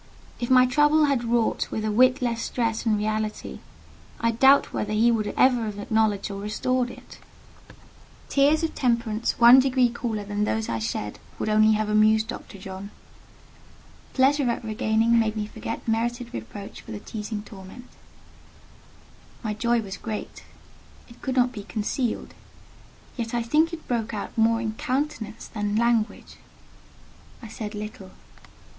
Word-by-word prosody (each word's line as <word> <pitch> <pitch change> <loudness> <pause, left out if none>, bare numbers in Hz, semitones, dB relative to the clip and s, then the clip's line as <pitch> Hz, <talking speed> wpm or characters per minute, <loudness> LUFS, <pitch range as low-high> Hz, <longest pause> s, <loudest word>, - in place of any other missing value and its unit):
If 240 - -3
my 255 -1 +7
trouble 295 +4 +4
had 275 -4 +1
wrought 235 -1 0
with 220 - -3
a 215 - 0
whit 255 +4 +4
less 230 -2 -1
stress 230 -1 -2
and 215 -1 +3
reality, 215 0 -3 0.6
I 230 0 +2
doubt 270 +4 +4
whether 210 0 -2
he 225 +3 +4
would 215 -2 0
ever 245 -3 +4
have 210 -1 -5
acknowledged 210 -1 0
or 200 0 -6
restored 245 +4 -1
it. - - -13 1.1
Tears 290 +3 +3
of 325 - -1
temperature 235 -3 0
one 240 +2 +9
degree 255 -2 +3
cooler 225 -3 -3
than 205 +1 -2
those 220 +1 -1
I 115 - -1
shed 110 -1 -4 0.2
would - - -2
only 215 0 +5
have 215 0 0
amused 215 +1 +3
Dr. 200 - -8
John. 190 +1 -8 1.3
Pleasure 270 0 +3
at 235 - -2
regaining 220 +1 +2
made 220 -1 0
me 210 - -1
forget 220 +2 -6
merited 235 +2 -1
reproach 115 - -8
for - - -16
the 210 - -5
teasing 210 0 -6
torment; 200 +4 -12 1.6
my 215 -2 -2
joy 235 +2 +1
was 195 -1 -7
great; 220 -2 -6 0.7
it 235 - -16
could 260 -2 -2
not 250 -1 +3
be 220 -4 -7
concealed: 220 +4 -3 0.8
yet 235 -1 -3
I 235 - 0
think 310 +8 +2
it 335 -2 -8
broke 230 -2 -2
out 205 - -6
more 225 0 +3
in 220 -2 -2
countenance 255 -2 -3
than 210 -1 -3
language. 230 -1 0 1.1
I - - -7
said 215 -1 -6
little. 210 -2 -7
225 Hz, 155 wpm, -25 LUFS, 210-245 Hz, 1.6 s, one